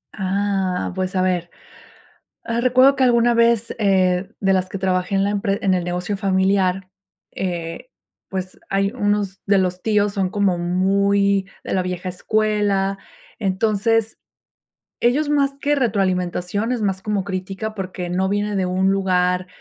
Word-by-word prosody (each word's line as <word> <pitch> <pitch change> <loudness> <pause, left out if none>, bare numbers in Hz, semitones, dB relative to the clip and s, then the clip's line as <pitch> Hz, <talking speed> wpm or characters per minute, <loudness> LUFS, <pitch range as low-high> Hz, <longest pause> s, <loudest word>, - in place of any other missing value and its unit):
Ah, 195 -1 -1
pues, 185 0 -3
a 185 - +2
ver, 180 -2 0 1.0
ah, 230 0 -1
recuerdo 255 +3 +5
que 265 - +3
alguna 240 -1 +4
vez, 235 -1 +3
eh, 185 -3 +2
de 195 -1 +2
las 185 -1 +1
que 195 - -5
trabajé 185 0 0
en 195 - +2
la 200 - +1
empre 200 -1 -1
en 190 -2 +3
el 180 - -1
negocio 180 +3 -2
familiar, 190 -1 +1 0.4
eh, 170 +3 -4 0.4
pues, 185 -1 -5
hay 195 0 +1
unos 205 -4 -1
de 200 -1 +4
los 185 -1 -1
tíos 210 -2 +1
son 195 -3 0
como 195 -2 +1
muy 195 +2 +1
de - - -5
la 185 - +1
vieja 180 0 -4
escuela. 200 0 0 0.4
Entonces, 215 +2 0 0.8
ellos 290 +5 +2
más 280 -2 +2
que 295 0 +2
retroalimentación, 195 -2 0
es 240 -3 -2
más 190 -2 -1
como 205 -2 -2
crítica, 195 +3 -4
porque 185 -2 -5
no 190 +2 0
viene 205 +1 -1
de 190 -2 0
un 185 +1 +1
lugar, 180 -1 +1
195 Hz, 155 wpm, -21 LUFS, 185-210 Hz, 1.0 s, recuerdo